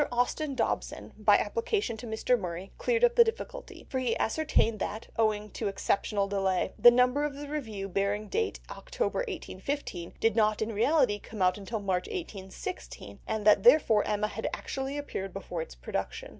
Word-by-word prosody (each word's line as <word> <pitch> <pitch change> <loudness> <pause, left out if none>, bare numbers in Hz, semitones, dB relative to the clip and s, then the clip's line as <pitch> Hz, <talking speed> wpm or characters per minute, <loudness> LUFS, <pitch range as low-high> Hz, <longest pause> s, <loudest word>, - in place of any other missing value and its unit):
Austin 265 +4 0
Dobson, - - -2
by - - +5
application 440 - -1
to 235 - -8
Mr. 225 +3 +1
Murray, 180 0 -5
cleared 475 -1 +1
up 485 0 +6
the 475 - +8
difficulty, 485 +2 -6
for 260 - -2
he 250 -3 0
ascertained 230 -5 +1
that, 220 +2 -4
owing 210 -2 +1
to - - -3
exceptional 200 +1 0
delays, 195 -2 0
the 240 - +10
number 250 +4 +3
of 295 -2 -2
the 290 +1 -7
Review 225 -10 -4
bearing 200 +2 -1
date 445 - -1
October 485 - -2
1815 285 - -4
did 225 -1 +2
not 215 -2 +3
in 220 +1 -2
reality 230 -1 +3
come 210 -1 -4
out 180 0 +4
until 215 +3 -4
March 190 -3 -1
1816, 330 - -7
and 220 -2 -2
that 210 -2 +6
therefore 235 -3 +6
Emma 210 0 0
had - - -3
actually 270 +1 -4
appeared 195 -9 -4
before 180 -3 -5
its 160 - -8
production. - - -4
220 Hz, 170 wpm, -29 LUFS, 200-285 Hz, -, the